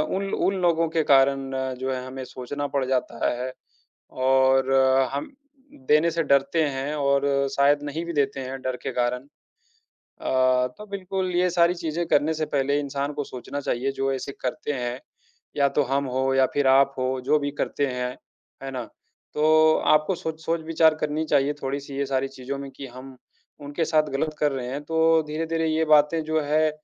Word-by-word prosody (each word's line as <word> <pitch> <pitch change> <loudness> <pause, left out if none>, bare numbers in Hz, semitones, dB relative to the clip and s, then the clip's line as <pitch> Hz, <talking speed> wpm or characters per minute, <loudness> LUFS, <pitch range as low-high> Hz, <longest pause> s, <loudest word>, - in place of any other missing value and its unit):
उन 195 - -1
ल - - -6
उन 195 - +1
लोगों 165 -1 +2
के 160 0 +1
कारण 135 0 +4 0.3
जो 130 +1 -2
है 130 0 -5
हमें 130 0 -7
सोचना 140 +3 -5
पड़ 135 -2 +1
जाता 125 -2 -1
है 125 +1 -3 0.6
और 130 0 +3 0.4
हम 140 - -3 0.6
देने 155 +3 +4
से 165 0 0
डरते 140 +4 +2
हैं 135 +2 -3
और 140 -1 +2 0.3
शायद 140 +1 +3
नहीं 150 +3 -4
भी 170 - -4
देते 140 -2 0
हैं 130 +1 -6
डर 130 -1 -2
के - - -3
कारण। 125 0 0 1.0
अ, 130 -1 +2
तो 210 - -9
बिल्कुल 190 -1 -3
ये 180 +1 +3
सारी 170 0 +3
चीज़ें 170 0 -3
करने 150 +2 +2
से 155 0 -2
पहले 140 0 0
इंसान 140 +1 -3
को 145 -1 -3
सोचना 135 +3 -6
चाहिए 135 0 -1
जो 135 0 -1
ऐसे 135 +1 -4
करते 155 -1 -3
हैं, 125 -1 -3 0.6
या 140 -1 +3
तो 145 - +1
हम 135 +2 0
हों 130 +1 0
या 130 - +5
फिर 145 -1 +1
आप 135 +1 +4
हों, 130 0 -1
जो 145 +4 +3
भी 145 -1 -2
करते 145 - 0
हैं, 125 -1 -3 0.5
है 135 - -4
ना। 125 -2 -4 0.5
तो 155 +1 +5 0.2
आपको 155 +5 +2
सोच 160 -1 -5
सोच-विचार 160 -1 +2
करनी 150 +1 -1
चाहिए 145 -1 +2
थोड़ी-सी 140 +1 -4
ये 140 - 0
सारी 135 0 -1
चीज़ों 135 +1 -6
में 140 0 -7
कि 140 - -7
हम 130 +1 -11 0.4
उनके 145 +3 -2
साथ 155 -1 +3
गलत 155 +3 -1
कर 150 -1 +2
रहे 125 -2 -4
हैं, 140 +3 -4
तो 160 +1 +3
धीरे-धीरे 165 +1 -1
ये 160 +1 +1
बातें 155 +1 +4
जो 155 0 0
है 155 +2 +2
140 Hz, 190 wpm, -24 LUFS, 135-155 Hz, 1.0 s, या